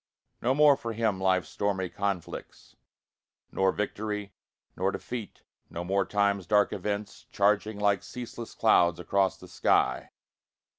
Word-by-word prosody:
No 130 +2 +2
more 150 -1 +6
for 115 -4 -5
him 110 -4 0
life's 95 -1 +2
stormy 100 -2 -1
conflicts, 100 -1 -5 0.8
Nor 95 0 +2
victory, 105 0 -3 0.4
nor 95 +2 0
defeat 115 -2 -7 0.3
no 85 - -5
more 95 +2 +1
time's 100 -3 +1
dark 105 0 +3
events, 100 +1 -4
Charging 105 +1 +2
like 100 -2 +2
ceaseless 120 +1 -8
clouds 90 -6 +4
across 95 +2 +1
the - - -13
sky. - - +1
100 Hz, 130 wpm, -28 LUFS, 95-110 Hz, 0.8 s, more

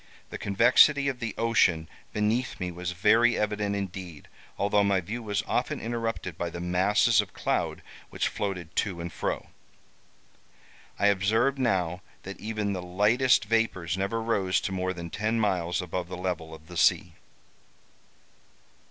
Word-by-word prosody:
The - - -6
convexity 125 +8 +5
of 130 -2 -5
the 115 -2 -4
ocean 90 -8 +2 0.2
beneath 110 +5 -1
me 90 -1 -3
was 90 +1 -4
very 115 +6 +4
evident 105 -1 -1
indeed, 90 -5 -6 0.3
although 100 0 +2
my 100 -1 +2
view 105 +7 -5
was 105 -3 -2
often - - -1
interrupted 115 -7 -4
by 85 - -2
the 85 - -7
masses 100 +6 +3
of 105 - -11
cloud - - -1 0.3
which - - -1
floated 90 -5 -4
to 95 -4 0
and 85 0 -6
fro. - - -3 1.5
I - - +1
observed 110 +7 +2
now 90 -8 0 0.2
that 100 +1 -8
even 105 -1 -2
the 95 - -3
lightest 105 +7 +3
vapors 105 -6 0
never 100 +4 -2
rose 100 -5 +1
to - - -3
more 95 -1 -1
than 85 -2 -7
ten 110 +2 -1
miles 90 -5 0
above 90 0 -4
the 90 - -6
level 90 -3 -3
of 80 -1 -12
the 85 - -8
sea. - - +3
100 Hz, 150 wpm, -27 LUFS, 90-110 Hz, 1.5 s, convexity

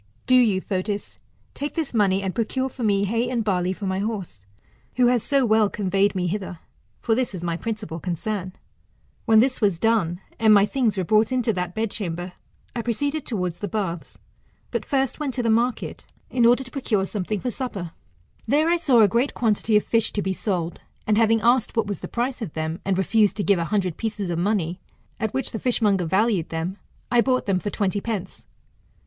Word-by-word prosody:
Do 255 - +2
you, 225 -7 +4
Fotis, 200 +2 -3 0.3
take 290 +1 -5
this 320 -6 -2
money, 200 -3 +2
and 190 -1 -2
procure 260 +3 -1
for 255 - -10
me 200 -2 +2
hay 230 +4 0
and 240 -3 0
barley 185 -3 0
for 195 +2 -5
my 190 0 -1
horse, 195 - -4 0.5
who 250 - +4
has 245 -2 +2
so 275 +1 +2
well 215 -2 +4
conveyed 195 0 +1
me 180 -1 0
hither: 185 0 -3 0.4
for 230 - +1
this 240 -3 0
is 175 - -6
my 170 -1 -1
principal 210 -2 -4
concern. 185 +2 -3 0.7
When 220 -1 +6
this 255 0 0
was 200 -5 +2
done, 180 -4 +1 0.2
and 220 -1 +6
my 200 0 +6
thmgs 230 -4 0
were 190 - +1
brought 215 +5 +3
into 245 -3 +1
that 180 -1 -3
bedchamber, 185 -5 -3 0.4
I 235 - -1
[proceeded 285 +6 -2
towards 180 -7 -2
the 205 - -3
baths, 180 -4 -4 0.5
but - - -2
first 270 -1 0
went 280 -4 -2
to 250 - -1
the 230 - +2
market 235 +2 0 0.3
in 240 -2 +4
order 245 +3 +4
to 250 - -13
procure 220 -8 0
something 205 +1 -3
for 250 - -2
supper. 200 -9 -4 0.6
There 300 +7 +3
I 345 - +4
saw 265 -8 +4
a 210 - +7
great 240 +7 0
quantity 215 -1 +2
of 210 - +1
fish 225 -1 +1
to 205 - -1
be 190 - -1
sold, 175 -4 -3 0.2
and 215 - +2
having 225 0 +3
asked 235 0 +2
what 225 - +3
was 205 -1 -4
the - - -6
price 245 +2 -2
of 195 -9 -5
them, 160 +2 -3
and 190 -1 0
refused 210 +3 +2
to 205 - 0
give 200 -3 +3
a 170 - -1
hundred 185 -4 -1
pieces 210 -5 -3
of 170 - -1
money, 180 -2 0 0.4
at 220 -2 -1
which 265 +1 -2
the 220 - -4
fishmonger 210 -7 +2
valued 190 0 +1
them, 165 +4 -3 0.3
I 240 -1 +5
bought 255 +1 +1
them 195 -2 +1
for 205 - -3
twenty 200 0 -1
pence. 200 -5 -5
210 Hz, 205 wpm, -24 LUFS, 190-235 Hz, 0.7 s, a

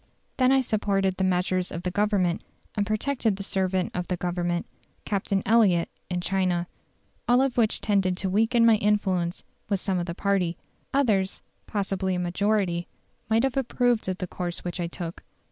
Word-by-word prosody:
Then 255 0 +4
I 270 0 +5
supported 195 -5 0
the 190 - 0
measures 185 0 +1
of 170 - -5
the 180 - -1
Government, 200 -3 +1 0.3
and 205 -1 -1
protected 225 0 0
the 195 - -5
servant 190 -1 0
of 180 0 -3
the 180 - -1
Government, 175 0 -1 0.4
Captain 195 -1 0
Elliot, 200 -7 +4 0.2
in 180 -1 -1
China. 180 -2 0 0.6
All 245 +1 +5
of 265 -2 +1
which 225 -3 +2
tended 190 -3 +1
to 190 - -2
weaken 225 +5 +3
my 225 -2 +6
influence 190 -4 0 0.3
with 200 -2 +1
some 185 -1 -1
of 175 - -3
the 170 - -4
party; 185 -4 0 0.3
others, 210 -9 +1 0.2
possibly 195 -2 -1
a - - -1
majority, 180 -1 0 0.4
might 225 +1 +3
have 270 -2 0
approved 245 -4 +1
of 185 - -2
the 185 - -3
course 175 -1 -5
which 175 0 -4
I 175 - -1
took. 170 0 -7
190 Hz, 175 wpm, -26 LUFS, 180-215 Hz, 0.6 s, my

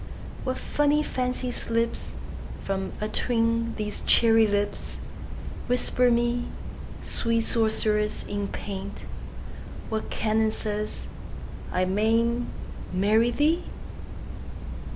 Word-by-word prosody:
What 255 0 0
funny 295 +1 +2
fancy 250 -2 -1
slipsFrom 230 -4 -3
atween 230 +1 +1
these 210 -1 -2
cherry 225 -1 +6
lips! 205 0 -1 0.7
Whisper 250 0 +3
me, 240 +1 +2 0.6
Sweet 230 0 +1
sorceress 220 -2 +2
in 205 0 -2
paint, 200 0 -5 0.8
What 220 -1 -2
canon 220 0 +2
says 210 0 -3 0.7
I 185 0 +2
may 220 +5 +3 0.7
n'tMarry 215 +5 +4
thee? 315 +4 +3
225 Hz, 85 wpm, -27 LUFS, 210-240 Hz, 0.8 s, cherry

